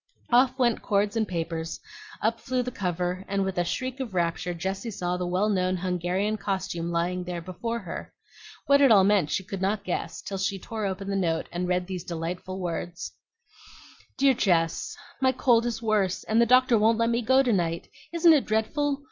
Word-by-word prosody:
Off 255 +2 +4
went 240 -3 +2
cords 205 +1 +1
and 220 -2 +1
papers, 165 -2 -3 0.4
up 225 +1 +1
flew 255 +1 -1
the 250 - -4
cover, 180 -2 -2
and 195 0 0
with 190 -2 -2
a - - +3
shriek 255 +8 -3
of 235 -8 -5
rapture 170 0 0
Jessie 190 +6 -3
saw 180 -4 -2
the 180 0 -2
well 185 +4 +1
known 185 -3 +1
Hungarian 180 +4 -1
costume 190 -4 -3
lying 175 +2 -1
there 180 -1 -4
before 185 +7 -4
her. 185 -7 -7 0.5
What 280 0 +5
it 275 -3 +6
all 200 -3 +7
meant 195 -6 +3
she 190 - -1
could 190 0 -6
not 200 +2 0
guess, 175 -2 -3
till 195 -1 -4
she 195 +1 -1
tore 215 +2 -4
open 195 +1 -4
the 200 - -1
note 165 -4 0
and 175 +1 -2
read 180 0 0
these 180 -2 -5
delightful 175 +3 -5
words: 175 0 -4 1.1
DEAR 275 0 +5
JESS, 180 - +1 0.2
My 260 0 +4
cold 240 -2 +3
is 230 -1 -4
worse, 205 -4 +1
and 220 +2 +2
the 235 - +4
doctor 255 -1 +5
won't 220 +1 +4
let 230 0 +2
me 235 +1 +1
go 260 +4 +4
to 245 -3 +2
night. 170 -3 -1 0.2
Isn't 335 -1 +6
it 295 - +3
dreadful? 275 +7 0
195 Hz, 200 wpm, -26 LUFS, 180-230 Hz, 1.1 s, all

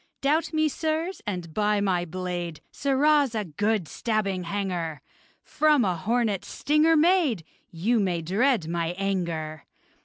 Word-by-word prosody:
Doubt 300 +4 +1
me, 310 -1 +2
sirs, 320 +4 -2
and 180 -5 -4
by 210 +1 +1
my 185 -3 +1
blade! 175 -2 -4
Sirrahs, 280 -2 +2
a 215 -2 -1
good 205 +2 -1
stabbing 200 -5 -1
hanger! 175 -5 -3 0.4
From 300 -5 +3
a 185 -2 +1
hornet's 215 +2 0
stinger 310 +2 +3
made! 310 - +3 0.3
You 215 +8 +1
may 180 -4 0
dread 210 - +1
my 170 0 -2
anger! 170 -6 -3
205 Hz, 130 wpm, -26 LUFS, 175-275 Hz, 0.4 s, From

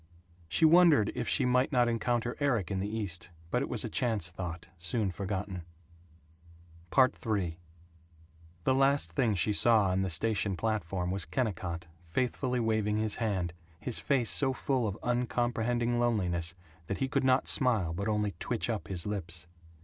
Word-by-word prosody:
She 90 - +3
wondered 160 - +6
if - - -3
she 135 - +2
might 125 +1 +2
not 125 -3 +3
encounter 120 +1 -1
Erik 120 - 0
in 95 - -1
the 100 - -2
East 100 -6 -4 0.2
but - - +1
it - - -3
was - - +1
a - - -2
chance 110 -8 0
thought, 85 -2 -6
soon 95 +4 0
forgotten. 95 0 -4 1.4
III 105 -9 +1 1.0
The 130 - +2
last 135 +2 +2
thing 120 -7 +1
she 100 +4 +1
saw 110 -2 +5
on 95 +1 +1
the 95 - -1
station 100 +2 +1
platform 95 -4 -2
was 95 -2 -2
Kennicott, 90 -4 -3 0.2
faithfully 125 +6 -1
waving 110 -2 0
his 110 -1 0
hand, 95 -7 -1 0.3
his 125 +2 +1
face 130 -5 +1
so 135 -2 +4
full 130 -2 -1
of 100 0 -4
uncomprehending 120 -1 0
loneliness 90 -8 0 0.3
that 100 - -2
he 135 - -1
could 135 +1 0
not 130 0 +3
smile 110 -11 +3
but 100 +5 -3
only 105 -1 0
twitch 120 0 -1
up 110 - -4
his 90 -3 -2
lips. 90 -5 -3
110 Hz, 160 wpm, -30 LUFS, 95-125 Hz, 1.4 s, wondered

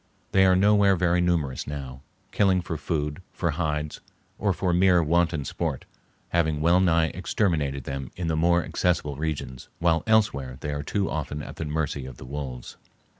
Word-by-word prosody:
They 95 0 +5
are 95 - +5
nowhere 100 0 +5
very 90 0 +2
numerous 80 -7 0
now, 70 -3 -6 0.3
killing 95 -3 +2
for 85 -2 -4
food, 75 0 -3
for 85 -2 -1
hides, 75 -2 -2 0.4
or 100 -1 +2
for 90 -1 0
mere 90 -1 +4
wanton 80 -2 +1
sport, - - -3 0.4
having 80 -3 +1
well 85 +4 +4
nigh 85 -3 +3
exterminated 80 -7 -1
them 70 0 -5
in 90 - -4
the 80 -1 0
more 85 +2 +3
accessible 80 -5 0
regions, 70 -4 -4
while 85 -1 +2
elsewhere 70 - +2
they 75 - -3
are 70 - -3
too 100 +6 -1
often 75 -1 -4
at - - -9
the 80 - -3
mercy 75 -3 -2
of 65 - -10
the - - -10
wolves. 65 -3 -6
80 Hz, 175 wpm, -26 LUFS, 75-90 Hz, 0.4 s, They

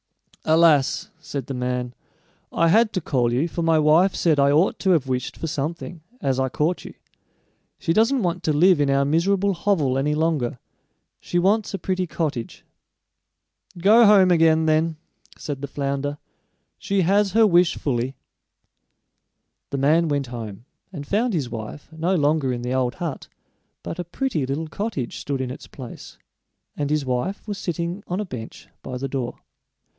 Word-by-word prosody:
"Alas!" 160 -4 +3
said 140 -2 -5
the 135 - -5
man; 125 -1 -2 0.6
"I 165 - +2
had 220 +4 +4
to 185 - -1
call 125 -5 0
you, 130 +7 +1
for 170 - -4
my 165 -1 +3
wife 160 +5 +4
said 155 -4 +2
I 140 0 +5
ought 160 +6 +2
to 190 - 0
have 165 -7 +3
wished 130 -1 -3
for - - -5
something, 165 +3 -4 0.2
as 135 - 0
I 130 0 +1
caught 155 +7 -1
you. - - -10 0.8
She 165 - 0
doesn't 230 +5 +3
want 175 0 -1
to 155 - +1
live 170 +2 +4
in 140 - +2
our 140 0 +3
miserable 195 +6 +2
hovel 165 -8 +1
any 150 +2 0
longer; 150 -6 0 0.6
she 175 - -3
wants 200 +3 +2
a - - -2
pretty 185 0 -2
cottage." 150 -8 -4 1.1
"Go 215 +6 +6
home 195 -3 +6
again, 160 -1 +4
then," 160 +1 +1 0.4
said 140 -3 -5
the 140 - -4
flounder; 140 +1 -3 0.6
"she 200 -1 0
has 195 +2 +2
her 225 0 +6
wish 175 -3 +3
fully." 130 -1 -2 1.5
The 140 - -3
man 155 +5 +3
went 145 -3 -1
home 115 -2 -7 0.3
and 150 -6 -7
found 215 - 0
his 135 -7 -2
wife 115 +5 -7
no 170 +4 0
longer 145 -4 +2
in 120 -1 -4
the 125 +1 -2
old 130 -2 0
hut, 170 -6 -5 0.6
but 165 - -6
a - - -1
pretty 175 - -2
little 150 +4 -3
cottage 165 - -4
stood 140 -2 -3
in 125 -1 -3
its 130 - -9
place, 125 -4 -10 0.6
and 145 -1 -2
his 150 -2 0
wife 130 - -2
was 205 -2 -4
sitting 175 +3 -3
on 180 +2 -2
a 210 - -2
bench 120 - -9
by 125 - -6
the 135 +2 -3
door. 130 -3 -4
155 Hz, 170 wpm, -23 LUFS, 135-180 Hz, 1.5 s, Go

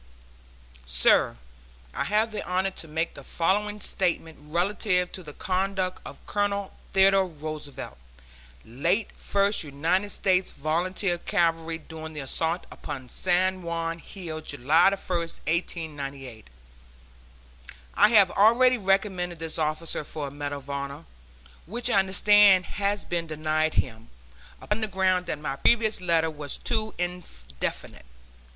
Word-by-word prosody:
SIR: - - +3 0.6
I - - -2
have 215 +2 +1
the 215 - -4
honor 185 +2 0
to 165 - -7
make 160 +2 -2
the - - -11
following 205 +4 0
statement 170 -5 -1
relative 180 +3 +1
to 185 - -6
the 155 -4 -10
conduct 185 +2 -2
of - - -11
Colonel 200 -1 -1 0.2
Theodore 195 0 +5
Roosevelt, 155 - -7 0.7
late 170 - 0
First 200 -1 0
United 165 +8 0
States 185 -1 +1
Volunteer 175 +4 -1
Cavalry, 165 -4 0
during 160 0 -9
the 150 - -6
assault 160 +6 -1
upon 130 -4 -7
San 185 +3 +1
Juan 165 -1 -3
Hill, 165 -4 -7
July 155 +5 +3
1, 195 - -2
1898. 155 - -4 1.5
I - - +6
have 205 -5 +7
already 240 +4 +5
recommended 190 -3 0
this 160 0 -4
officer 155 +1 -1
for 145 -1 -6
a - - -15
medal 145 0 -4
of 140 0 -13
honor, 140 +2 -5 0.6
which 240 +5 0
I 200 - +5
understand 195 0 +5
has 205 0 -2
been 170 -1 -2
denied 155 0 0
him, 115 -2 -2 0.5
upon 210 +2 -2
the 220 - 0
ground 185 -2 +1
that - - -2
my 150 -2 -4
previous 220 +2 +3
letter 165 -2 +2
was 145 -2 -5
too 220 -2 -2
indefinite. 65 - -5
175 Hz, 130 wpm, -26 LUFS, 155-195 Hz, 1.5 s, have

